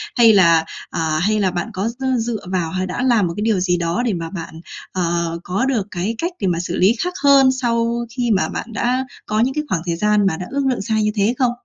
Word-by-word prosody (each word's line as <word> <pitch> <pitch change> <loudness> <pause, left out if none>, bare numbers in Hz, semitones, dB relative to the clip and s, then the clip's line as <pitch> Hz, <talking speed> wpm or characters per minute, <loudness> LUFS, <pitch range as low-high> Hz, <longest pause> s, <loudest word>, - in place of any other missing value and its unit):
Hay 230 -3 +6
là 170 -5 +5 0.2
à, 155 -1 -1
hay 215 +4 +1
là 190 -3 +1
bạn 175 -1 -3
có, 195 +5 -1
ờ, 260 -1 0
dựa 230 0 -2
vào, 175 -4 0
hay 185 +1 -2
đã 180 - -3
làm 235 -7 +3
một 170 - -4
cái - - -2
điều 220 -3 +2
gì 180 -1 +1
đó 170 +6 -1
để 230 - +1
mà 165 -2 -4
bạn, 165 -3 -8 0.3
ờ, 170 -2 -1
có 195 +8 -1
được 235 -7 0
cái 190 +6 -2
cách 345 +7 -2
để 195 - 0
mà 170 -2 0
xử 175 0 -3
lý 195 +6 +4
khác 360 0 -2
hơn 275 -2 +6
sau 235 0 0
khi 240 0 -1
mà 195 -2 +2
bạn 230 - -6
đã 250 +4 0 0.2
có 215 - -1
những 250 +4 +2
cái 300 +1 -2
khoảng 170 - 0
thời 170 -1 -1
gian 210 +3 +2
mà 165 -4 0
đã 180 - -5
ước 280 0 -1
lượng 255 - -1
sai 220 +1 0
như 210 - +1
thế 210 +2 +2
không? 250 -2 +2
210 Hz, 265 wpm, -19 LUFS, 175-235 Hz, 0.3 s, Hay